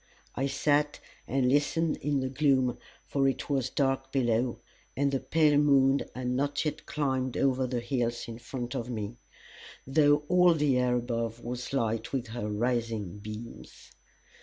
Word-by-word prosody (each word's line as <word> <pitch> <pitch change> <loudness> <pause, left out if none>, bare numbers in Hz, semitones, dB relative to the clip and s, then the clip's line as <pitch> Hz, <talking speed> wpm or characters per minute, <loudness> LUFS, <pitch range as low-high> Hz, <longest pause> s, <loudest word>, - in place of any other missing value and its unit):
I 135 +2 -1
sat 145 +1 +1 0.3
and 135 -1 +1
listened 145 +4 +2
in 145 -2 0
the 130 - -2
gloom, 130 -3 +2 0.3
for 135 -1 +1
it 135 +2 -2
was 130 -2 +1
dark 135 -1 0
below, 120 -2 +1 0.4
and 140 0 +2
the 135 - 0
pale 150 -1 +3
moon 140 -2 +4 0.2
had 125 0 -2
not 145 +4 0
yet 150 - -3
climbed 130 -4 -1
over 130 -1 +2
the 120 -1 -2
hills 120 -1 -2
in 115 0 -7
front 120 0 -5
of 120 +1 -3
me, 110 -1 -4 0.7
though 145 +1 +4
all 180 0 +5
the 145 -4 +2
air 125 -1 +2
above 115 -1 -2
was 125 +1 -5
light 115 -5 -1
with 125 -4 -2
her 110 -2 -4
rising 110 -3 -1
beams. 110 +3 -10
130 Hz, 160 wpm, -29 LUFS, 120-140 Hz, 0.7 s, all